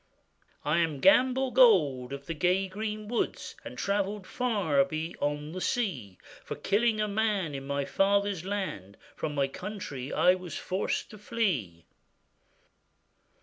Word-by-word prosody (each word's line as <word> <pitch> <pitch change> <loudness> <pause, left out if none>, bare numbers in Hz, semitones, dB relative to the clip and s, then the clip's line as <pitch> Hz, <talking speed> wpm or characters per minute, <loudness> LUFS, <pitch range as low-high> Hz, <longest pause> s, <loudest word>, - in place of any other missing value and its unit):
'I 150 +3 +2
am 160 -4 0
Gamble 260 - +4
Gold 150 - +5
of 140 0 -6
the 165 - -3
gay 180 +4 +1
green 210 +2 -4
woods, 235 +1 -2
And - - -9
travellèd 200 0 -1
far 195 - +1
beyond 150 0 -3
the 185 - -5
sea; 140 - -2 0.3
For - - -5
killing 215 +2 +1
a 210 - +1
man 205 -6 0
in 135 0 -6
my 140 0 -1
father's 200 -1 +1
land, 185 - -4 0.2
From 150 -1 -3
my 140 -1 +2
country 145 -5 -6
I 180 - +5
was 180 -4 -6
forced 190 +5 -2
to 215 - -11
flee. 140 - -1
185 Hz, 140 wpm, -29 LUFS, 145-210 Hz, 0.3 s, Gold